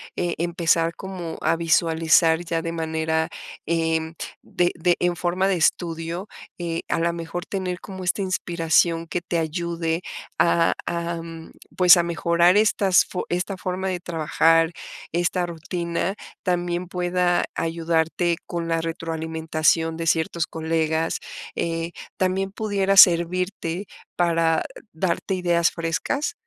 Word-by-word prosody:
eh, 175 -1 -1
empezar 170 0 +1
como 180 -4 -6
a - - +2
visualizar 165 0 +3
ya 165 -1 -1
de 165 0 -3
manera, 160 -1 -1 0.4
em, 160 -1 0 0.3
de 175 0 0
de 175 +1 +2
en 175 0 +1
forma 180 +2 0
de 195 - +2
estudio, 170 +2 -1 0.3
eh, 170 -1 -2
a - - 0
la 170 +1 +1
mejor 170 +2 -5
tener 185 -2 -3
como 190 -1 -8
esta 180 +3 0
inspiración 170 -2 +1
que 175 - -2
te 175 -1 -2
ayude 165 +1 -2 0.4
a 170 0 +3
a, 170 0 -2 0.6
pues, 180 -1 +8
a 175 - +3
mejorar 170 +2 +3
estas 200 -3 +4
fo 180 - -4
esta 190 +2 -3
forma 185 0 -3
de 180 -2 -2
trabajar, 165 0 +2 0.4
esta 175 +1 +1
rutina, 170 +2 -3 0.3
también 175 -1 -1
pueda 180 -1 +1
ayudarte 165 +1 0
con 170 -1 -4
la 165 0 0
retroalimentación 160 0 0
de 165 0 -3
ciertos 160 0 +1
colegas, 160 0 -1 0.4
eh, 165 0 -2 0.3
¿también 190 +1 0
pudiera 200 -2 0
servirte 180 +1 +4 0.3
para 165 -2 +2 0.3
darte 175 +3 -1
ideas 175 -2 +2
frescas? 165 - -2
170 Hz, 125 wpm, -23 LUFS, 165-180 Hz, 0.6 s, pues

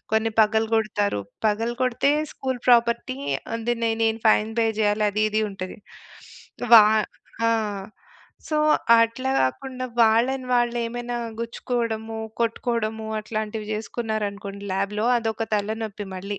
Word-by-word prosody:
కొన్ని 220 +1 +2
పగలగొడతారు. 220 - +1 0.3
పగలగొడితే 240 +5 +1 0.2
school 260 -2 -3
property 235 - +3 0.4
అది 235 +1 -1
నే 230 - +2
నేను 225 0 +1
ఫైన్ 215 0 +3
పే 225 - +3
జేయాలి 210 0 +2
అది, 210 +1 0
ఇది 215 +1 +1
ఉంటది. 185 -1 -7 1.0
వా 225 - +12 0.7
ఆ! - - +3 1.0
సో, 305 - 0 0.4
అట్లా 230 +3 0
గాకుండా 255 - -2 0.2
వాళ్ళని 240 +4 +3
వాళ్ళేమైనా 240 0 0 0.2
గుచ్చుకోవడము, 230 -1 -3 0.2
కొట్టుకోవడము 225 -1 -1
అట్లాంటివి 215 0 -4
జేసుకున్నారనుకోండి 210 -2 -4
లాబ్‌లో 200 +3 -1
అదొక 225 -1 -2
తలనొప్పి 210 0 -3
మళ్ళీ. 200 +2 -5
225 Hz, 105 wpm, -24 LUFS, 210-235 Hz, 1.0 s, వా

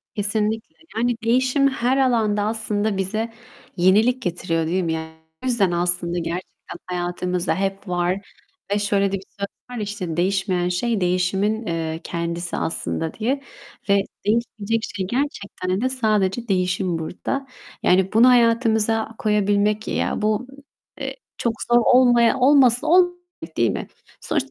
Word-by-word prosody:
Kesinlikle. 215 +1 -1 0.2
Yani 240 +1 +1
değişim 255 +4 +3
her 260 -1 +1
alanda 225 -6 +2
aslında 215 -1 -1
bize 215 +4 -2 0.5
yenilik 215 +8 +4
getiriyor, 170 -3 -1
değil 185 +3 0
mi? 165 -1 -1
Yani 160 0 -5 0.3
o - - -5
yüzden 215 -7 +2
aslında 175 0 0
gerçekten 170 +1 -6
hayatımızda 180 -1 -2
hep 195 +1 -3
var 180 +1 0 0.6
ve 205 - +1
şöyle 200 -1 +1
de 195 - 0
bir 190 - -11 0.2
söz 200 - -1 0.2
var - - -6
ya, - - -3
işte: 190 -6 -4
"Değişmeyen 185 -1 +1
şey 215 +3 0
değişimin, 195 +5 0
eee, 165 -1 -2
kendisi 170 +1 -3
aslında." 165 0 -2
diye 260 +6 -1 0.5
ve 200 0 +5 0.2
değişmeyecek 225 0 0
şey 190 -2 -2
gerçekten 200 -7 -2
de 255 - +1
sadece 220 -3 0
değişim 185 -2 0
burada. 265 - -4 0.4
Yani 190 +2 +3
bunu 230 +3 +6
hayatımıza 225 -2 +3
koyabilmek, 210 0 +1
ya - - -1
bu, 215 +4 0 0.5
eee, - - -4 0.2
çok 235 - 0 0.2
zor 240 - +7
olmaya 245 -1 +5
olmasa 255 -2 +5
olmaz, 355 +1 +5 0.5
değil 115 -1 +3
mi? - - -4 0.3
Sonuçta - - -1
205 Hz, 140 wpm, -22 LUFS, 180-230 Hz, 0.6 s, zor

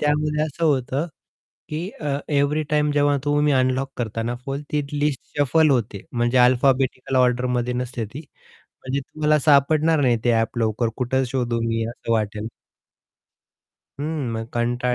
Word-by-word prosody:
त्यामध्ये 150 +1 +1
असं 155 +2 -3
होतं 140 0 +1 0.6
की 160 +5 -3
अ, 145 -2 -1
एव्हरी 145 +1 +1
टाईम 150 0 +2
जेव्हा 145 0 +2
तुम्ही 145 0 +2
अनलॉक 130 +1 +1
करताना 115 +1 -2
फोल 140 +1 -3
ती 150 - +1 0.2
लिस्ट 145 -4 0 0.2
शफल 155 +3 +4
होते 110 -6 -1
म्हणजे 120 +1 +1
अल्फाबेटिकल 130 +1 +2
ऑर्डरमध्ये 125 -1 +1
नसते 125 -2 -3
ती. 110 +8 -9 0.7
म्हणजे 130 +2 -1
तुम्हाला 150 +2 +1
सापडणार 150 +2 +4
नाही 125 -4 +3
ते 120 - +4
ॲप 115 +1 0
लवकर 110 +1 +1
कुठे 130 +1 0
शोधू 120 -2 -1
मी, 115 0 0
असं 115 -1 -4
वाटेल. 110 0 -1 1.5
हं, 150 -4 -2
मग 115 0 -3
कंटाळा 120 +1 0
130 Hz, 145 wpm, -22 LUFS, 120-150 Hz, 1.5 s, शफल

